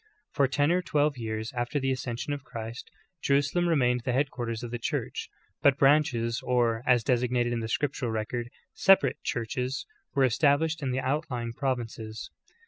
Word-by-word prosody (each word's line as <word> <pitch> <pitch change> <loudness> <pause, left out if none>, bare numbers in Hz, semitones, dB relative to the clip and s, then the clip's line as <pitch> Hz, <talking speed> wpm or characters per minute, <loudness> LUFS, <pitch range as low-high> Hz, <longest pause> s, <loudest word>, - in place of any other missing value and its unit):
^ - - -40 0.3
For 140 - +3
ten 145 +3 +2
or 180 +1 +2
twelve 150 -4 +1
years 110 0 -4
after 120 +4 -1
the 135 0 0
ascension 130 +2 -3
of 145 -2 -5
Christ, 115 -2 -7 0.3
Jerusalem 145 +5 +2
re 165 - +3
mained 125 -3 +2
the 125 - -1
headquarters 125 -4 -1
of 120 - -5
the 120 - -3
Church, - - -3 0.3
but 140 -1 +5
branches 135 -5 +3
or, 120 -2 +1
as 125 -2 +4
designated 120 0 +1
in 120 - -1
the 110 - -3
scriptural 135 0 -1
record, 115 +2 -3 0.2
separate 190 -8 +4
'•churches," 125 +3 -2 0.3
were 135 - +4
established 145 +5 +2
in 135 - -1
the 130 +1 0
outlying 130 -4 -2
provinces. 115 -4 -4
125 Hz, 170 wpm, -28 LUFS, 115-140 Hz, 0.3 s, but